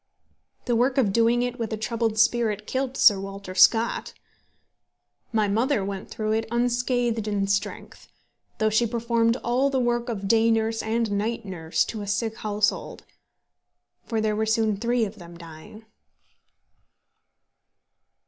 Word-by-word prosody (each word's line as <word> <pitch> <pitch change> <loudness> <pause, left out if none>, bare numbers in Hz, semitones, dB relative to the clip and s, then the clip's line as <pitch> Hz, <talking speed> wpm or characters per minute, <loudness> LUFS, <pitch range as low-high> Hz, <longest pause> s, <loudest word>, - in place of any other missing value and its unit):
The 240 - +1
work 255 +3 +1
of 215 -8 +2
doing 235 +2 +3
it 245 0 -4
with 230 -1 -3
a 220 - -2
troubled 225 0 -2
spirit 220 -2 +2
killed 265 +2 -3
Sir 205 -3 +6
Walter 195 -1 -7
Scott. 225 +5 +3 1.2
My 215 -2 +1
mother 225 +1 +1
went 195 -1 -6
through 215 -1 -3
it 220 +1 0
unscathed 240 -1 0
in 205 -1 0
strength, 200 0 -3 0.5
though 215 0 +1
she 230 +2 +2
performed 230 0 +1
all 250 +4 +1
the 270 -1 0
work 240 -1 0
of 200 -4 -4
day 225 +2 +4
nurse 225 0 0
and 225 0 -1
night 210 +3 -2
nurse 165 -4 -1
to 220 - -6
a 205 - -6
sick 220 +2 -2
household; 210 0 -2 1.0
for 225 - -2
there 215 -1 0
were 220 +1 -1
soon 220 -1 +1
three 235 +2 0
of 210 +1 -9
them 170 -1 -12
dying. 170 +6 -12
225 Hz, 150 wpm, -25 LUFS, 205-235 Hz, 1.2 s, Sir